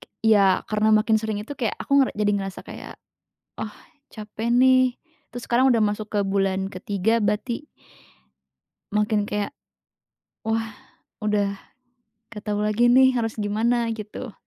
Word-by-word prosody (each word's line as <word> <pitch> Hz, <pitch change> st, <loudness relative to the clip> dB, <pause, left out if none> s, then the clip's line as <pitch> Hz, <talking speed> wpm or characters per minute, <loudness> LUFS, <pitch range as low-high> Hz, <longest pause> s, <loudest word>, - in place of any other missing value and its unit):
ke -, -, -16 dB, 0.2 s
ya 200 Hz, -4 st, +4 dB
karena 215 Hz, 0 st, +1 dB
makin 215 Hz, +1 st, +4 dB
sering 215 Hz, -2 st, -3 dB
itu 255 Hz, -, -7 dB
kayak 230 Hz, -5 st, -2 dB
aku 280 Hz, 0 st, +3 dB
ngera 265 Hz, -, +2 dB
jadi 210 Hz, -1 st, +1 dB
ngerasa 195 Hz, -2 st, -3 dB
kayak, -, -, -10 dB, 0.6 s
oh 215 Hz, -, -4 dB, 0.4 s
capek 220 Hz, +2 st, -4 dB
nih, 255 Hz, 0 st, +4 dB, 0.4 s
terus 245 Hz, 0 st, -7 dB
sekarang 255 Hz, +2 st, +4 dB
udah 230 Hz, -, +3 dB
masuk 210 Hz, 0 st, -1 dB
ke 210 Hz, -, 0 dB
bulan 195 Hz, -1 st, 0 dB
ketiga 200 Hz, +3 st, -1 dB
berarti 235 Hz, +7 st, -2 dB, 1.2 s
makin 210 Hz, 0 st, 0 dB
kayak, 210 Hz, +6 st, -2 dB, 0.9 s
wah 225 Hz, 0 st, -1 dB, 0.5 s
udah 205 Hz, -1 st, 0 dB, 0.8 s
gak 210 Hz, -3 st, -9 dB
tahu 210 Hz, 0 st, -1 dB
lagi 215 Hz, +3 st, +2 dB
nih 260 Hz, +2 st, +6 dB
harus 225 Hz, -1 st, -2 dB
gimana 230 Hz, +3 st, 0 dB
gitu. 220 Hz, +2 st, -7 dB
215 Hz, 140 wpm, -24 LUFS, 205-235 Hz, 1.2 s, nih